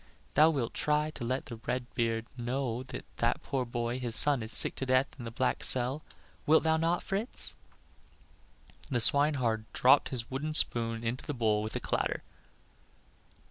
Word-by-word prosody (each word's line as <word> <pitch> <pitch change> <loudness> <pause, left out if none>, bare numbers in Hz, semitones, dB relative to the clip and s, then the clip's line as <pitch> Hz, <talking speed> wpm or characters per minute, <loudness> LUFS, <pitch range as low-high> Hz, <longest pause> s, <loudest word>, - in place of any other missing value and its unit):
Thou 155 +2 +5
wilt 135 -7 -2
try 150 +1 0
to 140 - -8
let 130 +3 -3
the 115 - -9
red 125 +2 -4
beard 115 -1 -1
know 125 0 -3
that 130 0 -9
that - - -1
poor 130 -2 -2
boy, 120 +1 -4
his 120 -3 -2
son, 145 -3 +4
is 110 +1 -3
sick - - +7
to 135 - -3
death 130 +1 +3
in 120 - -7
the - - -5
black 130 +3 -2
cell; 130 +4 +5 0.5
wilt 160 +2 +4
thou 160 0 +2
not, 165 +2 -1
Fritz?" 205 +6 -1 1.4
The 125 -4 0
swineherd 120 -4 +1
dropped 130 +3 +4
his 120 -3 -2
wooden 150 +4 -4
spoon 115 -5 +2
into 120 +6 -4
the 145 - -4
bowl 110 -3 0
with 110 0 -6
a - - -1
clatter. - - -2
125 Hz, 175 wpm, -29 LUFS, 115-145 Hz, 1.4 s, sick